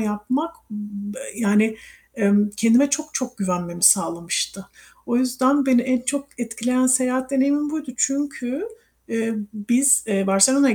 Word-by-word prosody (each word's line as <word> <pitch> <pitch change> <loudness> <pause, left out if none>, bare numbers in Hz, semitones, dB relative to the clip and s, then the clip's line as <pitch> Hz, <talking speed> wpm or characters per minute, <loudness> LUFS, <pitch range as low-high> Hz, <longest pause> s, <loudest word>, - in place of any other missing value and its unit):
yapmak 220 +10 -2 0.2
b 205 +1 -7 0.2
yani, 220 0 +2 0.4
emm, 205 -2 +2
kendime 235 +6 +4
çok 305 +2 -2
çok 250 -3 -4
güvenmemi 175 -3 -3
sağlamıştı. 170 +1 +1 0.4
O 240 - 0
yüzden 260 +2 +2
beni 255 -2 +4
en 255 -1 0
çok 275 +2 -3
etkileyen 245 +2 0
seyahat 255 0 +1
deneyimim 285 +2 +1
buydu. 305 -5 -5
Çünkü 275 - -2 0.4
eee, 225 0 -2 0.2
biz, 250 +5 +3
eee, 195 -2 0
Barcelona'ya 255 +7 +4
245 Hz, 130 wpm, -21 LUFS, 210-270 Hz, 0.4 s, kendime